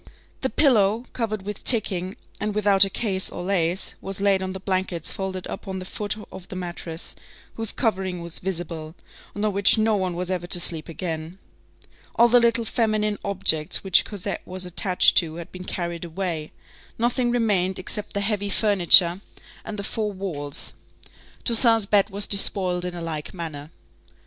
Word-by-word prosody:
The 265 - 0
pillow, 225 -4 +3
covered 215 -4 -3
with 205 0 -6
ticking, 190 -5 0 0.2
and 210 0 -3
without 205 -2 +5
a 195 - +6
case 190 -2 +1
or 175 - -7
lace, 180 -1 +1
was 195 0 -6
laid 195 -1 +2
on 185 0 -4
the 190 - -6
blankets 185 -3 -1
folded 190 -1 -5
up - - -8
on 190 0 -4
the 185 - -6
foot 205 +2 -3 0.2
of 185 - -11
the - - -8
mattress, 175 -2 -4 0.4
whose 225 -1 -2
covering 190 -6 -1
was 170 -1 -2
visible, 165 -3 -4 0.4
and 205 +1 -2
on 210 - 0
which 200 +3 +5
no 220 0 +2
one 185 -3 -2
was 180 +1 -3
ever 175 -2 -3
to 180 - +5
sleep 165 -2 +2
again. 165 0 -5 0.8
All 235 - +6
the 245 +1 +6
little 235 0 +2
feminine 215 -2 0
objects 180 -6 +1
which 190 -3 +4
Cosette 200 -2 -4
was 185 0 -2
attached 180 +1 +3
to 160 -3 +3
had 170 -1 -9
been 185 0 -9
carried 170 -2 -4
away; 170 -2 -4 0.5
nothing 240 +1 +1
remained 205 -6 +1
except 205 +2 -1
the 200 - -1
heavy 205 0 -1
furniture 190 -3 +5 0.4
and 215 - -7
the 200 - -4
four 210 +1 -2
walls. 160 -8 -3 0.7
Toussaint's 230 -2 +4
bed 200 0 +2
was 200 0 0
despoiled 185 -3 +1
in 175 -1 -5
like 155 +1 -6
manner. 155 -4 -7
190 Hz, 170 wpm, -23 LUFS, 175-210 Hz, 0.8 s, a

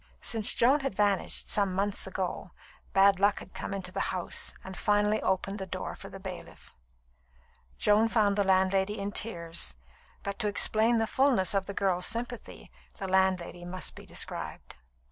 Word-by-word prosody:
Since 220 -3 +3
Joan 265 +5 +4
had 270 -8 -3
vanished, 200 -2 +2
some 200 -3 +2
months 200 +1 -1
ago, - - -4 0.4
bad 195 0 +5
luck 205 +1 +3
had - - -10
come - - -6
into 190 -2 -5
the - - -4
house 180 -2 0
and 190 0 -8
finally 210 +2 +1
opened 195 +2 -1
the 190 - -5
door 185 +1 -5
for 195 - -10
the 195 - -10
bailiff. 190 -2 -10 1.0
Joan 215 +2 +3
found 210 -3 +2
the 205 - +2
landlady 190 +2 +2
in 200 0 -3
tears; 170 - -1 0.5
but 200 +2 -5
to 215 - 0
explain 220 +3 +3
the 225 - +2
fulness 245 -8 +2
of 195 -1 0
the 200 - -6
girl's 180 -2 +1
sympathy, 240 0 -5 0.3
the 195 - -5
landlady 185 -2 +1
must 185 +1 -4
be - - -13
described. - - -4
195 Hz, 165 wpm, -29 LUFS, 190-210 Hz, 1.0 s, bad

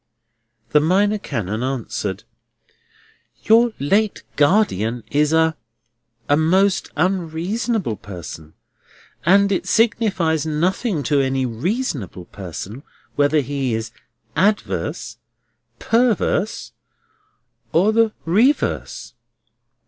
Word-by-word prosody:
The 150 - +5
Minor 200 +7 +2
Canon 110 - -3
answered: 115 -6 -3 1.2
"Your 230 +2 +5
late 200 +9 +1
guardian 135 - +2
is 150 +1 +2
a—a 120 -5 -2
most 185 +5 +2
unreasonable 180 - -1
person, 80 -4 -9 0.7
and 200 +2 +5
it 190 - -1
signifies 205 -8 +2
nothing 165 - -1
to 145 -1 +2
any 135 -1 0
reasonable 125 - -3
person 95 - -8 0.3
whether 145 +1 +3
he 135 -3 -2
is 110 0 -4 0.4
_ad_verse, 205 +2 -1 0.6
_per_verse, 225 -3 +1 1.0
or 195 +6 +3
the 225 -1 +3
_re_verse." 225 - +1
160 Hz, 85 wpm, -20 LUFS, 120-200 Hz, 1.2 s, The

